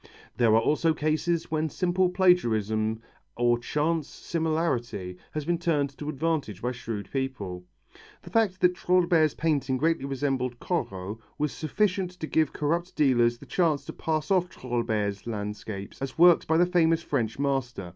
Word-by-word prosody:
There 115 -3 +4
are - - +6
also 155 +5 +2
cases 155 +2 0
when 155 0 0
simple 180 +2 +1
plagiarism 110 - +2 0.3
or 120 0 +3
chance 150 +5 -1
similarity 155 - -2
has 150 -1 -3
been 170 +1 0
turned 145 -5 0
to 150 - -4
advantage 155 - -2
by 125 - 0
shrewd 115 -5 -5
people. 105 -10 -4 0.6
The - - -11
fact 205 -5 +1
that 180 0 +5
Trouillebert's 175 -4 +2
painting 145 -5 0
greatly 160 0 +1
resembled 135 -3 -2
Corot, 100 - -3 0.2
was 150 -1 0
sufficient 185 +3 0
to - - -3
give 155 -1 +1
corrupt 170 +4 -1
dealers 120 -5 +3
the - - -13
chance 160 -6 +1
to - - -7
pass 155 +3 -2
off 180 -2 +3
Trouillebert's 115 - -2
landscapes 105 -1 -5
as 135 -1 -4
works 175 0 +6
by 160 - +3
the 175 - +5
famous 165 -2 +2
French 110 -2 -1
master. 135 -9 -2
145 Hz, 155 wpm, -27 LUFS, 120-165 Hz, 0.6 s, are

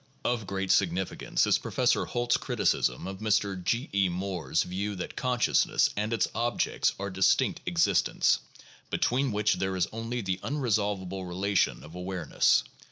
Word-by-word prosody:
Of 115 -5 -1
great 95 -1 -1
significance 95 0 +1
is - - +3
Professor - - +1
Holt's 120 0 0
criticism 60 - 0
of 95 0 -6
Mr. 100 -3 0
G. 115 +8 0
B. 100 -2 +2
Moore's 90 -2 -1
view 100 +3 -3
that 90 - -6
consciousness 125 -1 +2
and 105 +2 -2
its 115 - +1
objects 120 0 0
are 100 0 -3
distinct 95 +1 +2
existents, 85 -1 +2 0.5
between 130 +1 +1
which 105 0 +2
there 95 0 -1
is 90 -2 +1
only 115 +2 -3
the 95 -2 -2
unresolvable 100 -8 -1
relation 95 +3 0
of 75 - -12
awareness. 90 -3 +1
100 Hz, 145 wpm, -28 LUFS, 95-115 Hz, 0.5 s, is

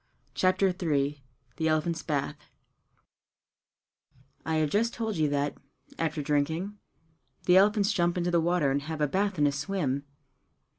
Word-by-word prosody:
CHAPTER 185 +1 +3
III 145 -3 0 0.4
The 160 - 0
Elephants' 160 +1 0
Bath 150 0 -3 1.9
I 160 - -1
have 155 -2 +1
just 230 +3 +1
told 220 -5 -2
you 155 -2 +2
that, 145 0 -1 0.4
after 155 -2 -1
drinking, 160 +8 -1 0.7
the 180 +1 +6
elephants 205 +1 +4
jump 175 -2 +1
into 175 0 0
the 170 -1 +3
water 170 -4 +2
and 140 +1 0
have 155 +2 -5
a 150 - +2
bath 195 +5 0
and 145 -1 +4
a - - +2
swim. 140 -2 -2
160 Hz, 145 wpm, -28 LUFS, 145-185 Hz, 1.9 s, the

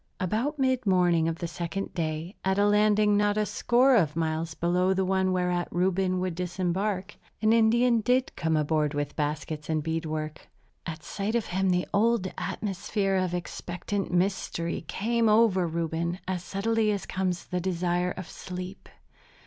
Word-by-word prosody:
About 225 - -1
mid 260 -4 +1
morning 175 -3 +3
of 165 0 -2
the 170 - -3
second 175 +3 -4
day, 160 +2 -3
at 190 0 +1
a 205 - +4
landing 210 0 +4
not 205 0 +2
a 210 - +2
score 250 +5 +3
of 160 -8 +2
miles 160 0 -1
below 180 +2 +1
the 190 0 +1
one 190 0 +1
whereat 180 -1 0
Reuben 185 +1 +1
would 185 -1 -1
disembark, 185 +3 -2 0.2
an 215 +1 +3
Indian 230 +1 +4
did 250 +4 +1
come 160 -1 0
aboard 150 -1 +1
with 145 0 -2
baskets 150 +1 -3
and 155 -1 0
bead 160 +1 -2
work. 155 0 -5 0.4
At 155 -1 -6
sight 205 +3 -3
of 235 - +1
him 190 +1 0
the 180 0 +1
old 210 -2 +2
atmosphere 195 0 -2
of 185 -1 0
expectant 180 +2 -4
mystery 175 -2 -1
came 225 +5 +1
over 210 -5 +4
Reuben 170 +1 -2
as 185 -2 -2
subtly 215 +4 0
as 200 -2 -2
comes 185 -2 -2
the 180 0 -2
desire 180 0 0
of 185 - -6
sleep. 180 +1 -8
185 Hz, 165 wpm, -27 LUFS, 170-205 Hz, 0.4 s, a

